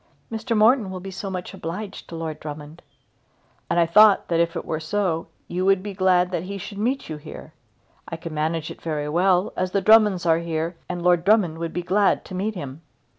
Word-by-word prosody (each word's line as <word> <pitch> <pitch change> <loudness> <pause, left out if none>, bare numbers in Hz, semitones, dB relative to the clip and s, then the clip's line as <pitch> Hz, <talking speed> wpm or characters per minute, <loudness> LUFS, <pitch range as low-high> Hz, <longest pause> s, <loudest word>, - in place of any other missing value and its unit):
"Mr. 225 +1 -2
Morton 220 -1 +4
will 185 -1 -5
be 195 +1 -8
so 195 +1 -5
much 185 -1 -5
obliged 190 +5 -7
to 170 - -7
Lord 160 -2 -5
Drummond." 150 +1 -8 0.9
"And - - +2
I 170 - +5
thought 210 +4 +5
that 165 -1 +1
if 170 0 +1
it - - -4
were 155 - -2
so, 165 0 -1 0.2
you 180 +1 -2
would 195 -1 +3
be 205 -1 -5
glad 185 -1 +2
that 175 - -1
he 200 +3 -6
should 200 +1 -8
meet 255 +6 -1
you 155 - -5
here. 150 +1 -11 0.5
I 165 - -5
could 165 0 -7
manage 155 +1 -2
it - - -11
very 150 -2 -3
well, 180 +3 +2
as 185 0 -2
the 200 - +3
Drummonds 210 -3 +5
are 165 -1 +4
here, 165 0 -3
and 175 -1 -4
Lord 175 -1 +3
Drummond 185 -6 +3
would 165 -1 -3
be 175 - -3
glad 195 +3 +2
to - - -10
meet 205 +4 -2
him." 140 -3 -7
180 Hz, 220 wpm, -23 LUFS, 165-200 Hz, 0.9 s, I